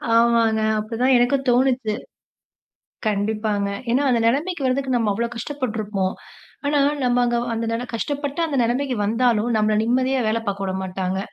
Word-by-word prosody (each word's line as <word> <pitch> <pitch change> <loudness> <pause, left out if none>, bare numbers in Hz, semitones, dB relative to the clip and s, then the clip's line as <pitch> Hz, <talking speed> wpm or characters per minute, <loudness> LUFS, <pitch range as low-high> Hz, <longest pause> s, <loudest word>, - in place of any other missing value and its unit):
ஆமாங்க. 230 -1 +3 0.2
அப்டி 215 +2 -5
தான் 260 +1 +5
எனக்கும் 265 +3 +1
தோணுச்சு. 245 -3 +2 1.1
கண்டிப்பாங்க. 210 0 0 0.2
ஏன்னா, 255 +4 +2
அந்த 240 -2 +2
நெலைமைக்கு 290 +5 0
வரதுக்கு 260 0 0
நம்ம 225 -3 +1
அவ்வளோ 235 +4 -1
கஷ்டப்பட்டுருப்போம். 215 -7 -2 0.5
ஆனா 290 0 +2 0.2
நம்ம 245 -1 +2
அங்க 240 0 +1 0.2
அந்த 230 0 -2 0.2
கஷ்டப்பட்டு 285 +5 -3
அந்த 295 -3 -3
நெலைமைக்கு 250 +3 0
வந்தாலும், 230 +1 +1
நம்மள 215 0 +2
நிம்மதியா 255 +3 +1
வேல 220 +1 +1
பார்க்க 195 -1 -2
வுட 190 - -2
மாட்டாங்க. 185 0 -3
235 Hz, 145 wpm, -22 LUFS, 215-260 Hz, 1.1 s, தான்